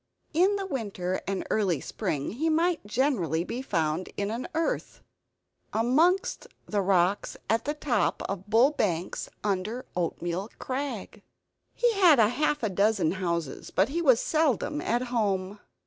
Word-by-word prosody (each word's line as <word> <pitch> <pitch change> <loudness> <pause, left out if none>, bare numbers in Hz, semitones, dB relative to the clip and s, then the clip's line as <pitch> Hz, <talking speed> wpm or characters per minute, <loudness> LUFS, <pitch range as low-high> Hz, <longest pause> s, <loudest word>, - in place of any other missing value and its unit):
In 375 +6 +3
winter 195 -7 -2
and 195 -1 -2
early 190 -8 +1
spring 140 +2 -3
he 305 - -1
might 330 - +1
generally 205 - +1
be 240 +7 -4
found 165 -6 -1
in 200 +1 -1
an 235 +3 -4
earth 325 0 -2 0.7
amongst 310 - +2 0.2
the 205 -1 0
rocks 190 0 +1
at 225 +2 +1
the 295 +2 -1
top 240 -10 0
of 195 +1 -5
Bull 235 +6 +5
Banks, 180 - -2
under 210 +5 -2
Oatmeal 175 +3 -2
Crag. 255 -6 -4 0.5
He 480 -1 +2
had 360 -8 +6
half 245 +6 +2
a 220 - +1
dozen 200 -3 +2
houses, 170 -5 -3
but 195 +6 +2
he 335 +5 -1
was 260 -8 +5
seldom 305 -1 +1
at 240 +2 0
home. 200 -3 0
215 Hz, 140 wpm, -27 LUFS, 185-280 Hz, 0.7 s, had